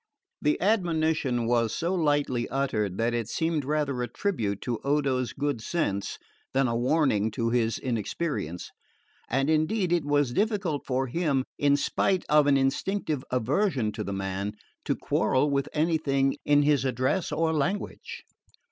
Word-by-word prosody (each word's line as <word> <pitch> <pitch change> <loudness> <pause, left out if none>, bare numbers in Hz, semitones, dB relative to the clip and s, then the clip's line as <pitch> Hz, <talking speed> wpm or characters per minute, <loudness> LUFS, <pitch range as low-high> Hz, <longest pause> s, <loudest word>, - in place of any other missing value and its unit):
The 150 - +1
admonition 160 - +1
was 115 -1 +1
so 170 +3 -1
lightly 145 -8 +1
uttered 105 -8 -1
that 115 +1 +1
it 115 -2 -2
seemed 160 0 0
rather 140 -2 -1
a 120 - -1
tribute 115 - -2
to 120 -3 -2
Odo's 135 -3 +1
good 140 -4 -2
sense 105 - -2 0.4
than 135 -1 +3
a 115 - -1
warning 120 -4 +2
to 115 0 -1
his 115 -2 +1
inexperience; 115 - -3 0.6
and 135 +3 +1
indeed 170 +4 +1
it 170 -3 +2
was 145 -3 +1
difficult 200 - 0
for 130 0 0
him, 140 -1 0 0.2
in 145 0 +4
spite 185 +5 0
of 150 -1 +5
an 140 -1 +5
instinctive 145 +2 -1
aversion 130 - +1
to - - -5
the 100 - -4
man, 95 +1 -3 0.3
to - - +1
quarrel 145 +3 +1
with 140 0 0
anything 150 -4 +1
in 145 0 +4
his 145 -2 +3
address 130 +7 0
or 160 0 +1
language. 180 +7 -3
140 Hz, 150 wpm, -27 LUFS, 120-155 Hz, 0.6 s, of